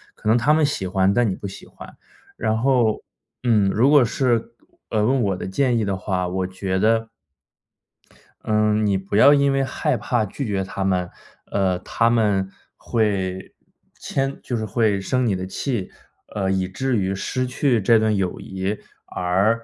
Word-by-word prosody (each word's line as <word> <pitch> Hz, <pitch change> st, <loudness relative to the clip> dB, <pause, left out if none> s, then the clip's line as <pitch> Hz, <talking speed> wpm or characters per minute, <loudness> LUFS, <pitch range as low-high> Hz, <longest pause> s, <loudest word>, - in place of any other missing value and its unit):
可 -, -, -8 dB
能 115 Hz, -, +5 dB
他 135 Hz, +6 st, +3 dB
们 155 Hz, 0 st, +3 dB
喜 120 Hz, -10 st, -2 dB
欢， 95 Hz, +1 st, +2 dB
但 120 Hz, -1 st, +2 dB
你 95 Hz, -, -2 dB
不 100 Hz, -, -7 dB
喜 95 Hz, -, -11 dB
欢。 -, -, -13 dB, 0.4 s
然 110 Hz, 0 st, 0 dB
后， 120 Hz, -3 st, +2 dB, 0.4 s
嗯， 105 Hz, -5 st, +3 dB
如 115 Hz, +7 st, +3 dB
果 145 Hz, -3 st, +6 dB
是， 120 Hz, -1 st, 0 dB, 0.4 s
呃， 110 Hz, -2 st, +1 dB
问 130 Hz, +1 st, +2 dB
我 100 Hz, -4 st, 0 dB
的 -, -, -5 dB
建 120 Hz, +5 st, +1 dB
议 115 Hz, -, +1 dB
的 100 Hz, -1 st, -1 dB
话， 90 Hz, -1 st, -2 dB
我 95 Hz, +1 st, -2 dB
觉 95 Hz, 0 st, -3 dB
得 115 Hz, +2 st, +2 dB, 1.3 s
嗯， 105 Hz, 0 st, +2 dB
你 100 Hz, -2 st, +2 dB
不 95 Hz, +1 st, -5 dB
要 140 Hz, +6 st, +8 dB
因 140 Hz, -1 st, +3 dB
为 135 Hz, 0 st, +1 dB
害 130 Hz, -1 st, -1 dB
怕 115 Hz, +1 st, 0 dB
拒 135 Hz, +7 st, -5 dB
绝 100 Hz, -2 st, -1 dB
他 95 Hz, +1 st, -4 dB
们， 90 Hz, -2 st, 0 dB, 0.4 s
呃， 95 Hz, -2 st, +1 dB
他 115 Hz, +5 st, +1 dB
们 105 Hz, -5 st, +1 dB, 0.3 s
会 95 Hz, -4 st, -2 dB, 0.5 s
迁 135 Hz, 0 st, -2 dB
就 125 Hz, -, -4 dB
是 110 Hz, -, -2 dB
会 105 Hz, -1 st, +1 dB
生 130 Hz, +5 st, 0 dB
你 100 Hz, -, +1 dB
的 95 Hz, 0 st, -4 dB
气， 100 Hz, +1 st, -3 dB, 0.4 s
呃， 95 Hz, -2 st, -1 dB
以 95 Hz, -1 st, 0 dB
至 130 Hz, +8 st, -2 dB
于 95 Hz, -1 st, 0 dB
失 130 Hz, +6 st, -2 dB
去 125 Hz, -2 st, +1 dB
这 115 Hz, +2 st, +4 dB
段 110 Hz, -1 st, +1 dB
友 95 Hz, -2 st, -2 dB
谊 95 Hz, +2 st, -4 dB, 0.3 s
而 95 Hz, +5 st, +1 dB
不 -, -, -20 dB
105 Hz, 195 characters per minute, -22 LUFS, 95-120 Hz, 1.3 s, 要